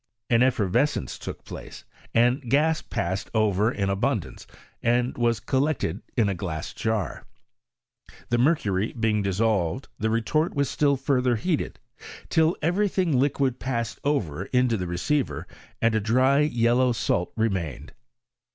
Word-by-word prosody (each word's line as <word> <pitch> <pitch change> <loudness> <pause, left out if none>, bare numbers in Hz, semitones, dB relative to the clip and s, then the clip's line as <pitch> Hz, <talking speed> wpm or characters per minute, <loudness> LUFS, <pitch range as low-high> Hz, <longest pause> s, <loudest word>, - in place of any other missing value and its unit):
An 115 0 +5
effervescence 120 - +1
took - - -7
place - - -9 0.3
and 120 +3 +3
gas 155 +4 +3
passed 95 +3 -3
over 105 0 +2
in 100 -5 -1
abundance, 100 - -2 0.3
and 120 +1 +1
was 120 -2 +1
collected 130 - -1 0.2
in 115 -4 +4
a 100 - 0
glass 85 -3 -5
jar; 110 -6 -2 1.0
the 120 - +2
mercury 110 - +1
being 110 -3 +1
dissolved 100 +1 0
the 110 - 0
retort 155 +10 0
was 140 -1 +1
still 140 -2 +2
fur 135 -1 +1
ther 125 -1 +2
heated, 155 +8 -1 0.5
till 160 +1 +3
every 195 +6 +2
thingliquid 140 -7 +1
passed 115 -3 -3
over 95 - -1
into 125 -1 +2
the 90 -4 -3
receiver, 130 - -1 0.4
and 115 -1 +4
a 110 - +2
dry 130 +6 +3
yellow 125 -3 +3
salt 110 -6 0
remained. 85 - -2
120 Hz, 135 wpm, -25 LUFS, 100-135 Hz, 1.0 s, An